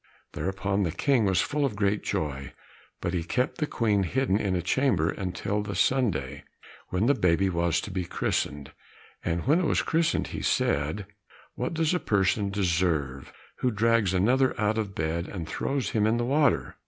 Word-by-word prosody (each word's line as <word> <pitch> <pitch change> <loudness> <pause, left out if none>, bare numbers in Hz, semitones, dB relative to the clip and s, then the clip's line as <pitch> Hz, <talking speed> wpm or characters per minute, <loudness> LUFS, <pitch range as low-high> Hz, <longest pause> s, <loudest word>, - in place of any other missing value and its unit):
Thereupon 100 +1 -1
the 85 -4 0
King 130 - +2
was 95 -2 +3
full 145 0 -1
of 130 -7 0
great 100 0 +1
joy, 70 -3 -3 0.5
but 85 - -2
he 85 -2 -1
kept 125 - -1
the 150 - 0
Queen 105 -7 +1
hidden 125 +3 0
in 100 -3 0
a 90 - 0
chamber 95 - +2
until 95 +2 -3
the 100 -1 -5
Sunday, 95 - 0 0.5
when 90 +4 0
the 140 - +5
baby 95 -4 +2
was 85 -1 +1
to - - -7
be 95 - -2
christened. 75 -4 -2 0.5
And 85 0 -2
when 150 +7 +4
it 185 - 0
was - - +1
christened 165 0 +1
he - - -5
said, 75 +8 0 0.5
"What - - -3
does 160 +1 +1
a 180 - +1
person 100 - +1
deserve 85 -8 -1 0.3
who 125 - +1
drags 115 -2 +2
another 125 +8 +2
out 110 +1 +1
of 100 -3 -4
bed 80 +2 -2
and 85 -5 -6
throws 130 - -2
him 110 -1 +2
in 115 +2 +2
the 120 - 0
water?" 145 +3 +1
100 Hz, 180 wpm, -27 LUFS, 85-120 Hz, 0.5 s, the